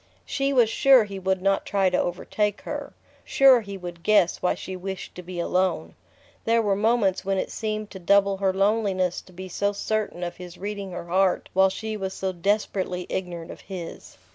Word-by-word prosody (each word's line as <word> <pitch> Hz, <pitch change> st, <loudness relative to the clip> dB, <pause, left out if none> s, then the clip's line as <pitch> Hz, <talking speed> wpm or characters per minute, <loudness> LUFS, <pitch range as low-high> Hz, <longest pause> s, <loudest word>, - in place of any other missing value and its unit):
She 275 Hz, 0 st, -1 dB
was 245 Hz, -4 st, +5 dB
sure 260 Hz, +2 st, +5 dB
he 200 Hz, -2 st, -7 dB
would 190 Hz, 0 st, -1 dB
not 195 Hz, 0 st, +2 dB
try 195 Hz, -2 st, +1 dB
to 180 Hz, -, +2 dB
overtake 205 Hz, +3 st, -1 dB
her: -, -, -6 dB, 0.3 s
sure 265 Hz, -3 st, +6 dB
he 200 Hz, -2 st, -7 dB
would 175 Hz, -2 st, -8 dB
guess 205 Hz, -3 st, +3 dB
why 180 Hz, -, +1 dB
she 190 Hz, -, -7 dB
wished 190 Hz, +1 st, -6 dB
to 180 Hz, -, -8 dB
be 180 Hz, 0 st, -7 dB
alone. 185 Hz, +2 st, 0 dB, 0.5 s
There 230 Hz, +1 st, +3 dB
were 200 Hz, -2 st, +2 dB
moments 210 Hz, -2 st, +2 dB
when 195 Hz, 0 st, 0 dB
it -, -, -2 dB
seemed 215 Hz, -1 st, -3 dB
to 190 Hz, -, -8 dB
double 200 Hz, +2 st, +3 dB
her 190 Hz, -1 st, +2 dB
loneliness 195 Hz, -2 st, +1 dB
to -, -, -19 dB
be 185 Hz, +1 st, -8 dB
so 200 Hz, +3 st, -1 dB
certain 210 Hz, -3 st, -2 dB
of 175 Hz, -, -5 dB
his 180 Hz, -1 st, -10 dB
reading 200 Hz, -1 st, -5 dB
her 175 Hz, -1 st, -6 dB
heart 185 Hz, +2 st, +1 dB
while 190 Hz, +1 st, +5 dB
she 215 Hz, +3 st, -4 dB
was 190 Hz, -1 st, -4 dB
so 190 Hz, 0 st, -2 dB
desperately 185 Hz, -1 st, -1 dB
ignorant 175 Hz, -3 st, -4 dB
of -, -, -11 dB
his... 180 Hz, -4 st, -8 dB
195 Hz, 195 wpm, -25 LUFS, 180-210 Hz, 0.5 s, sure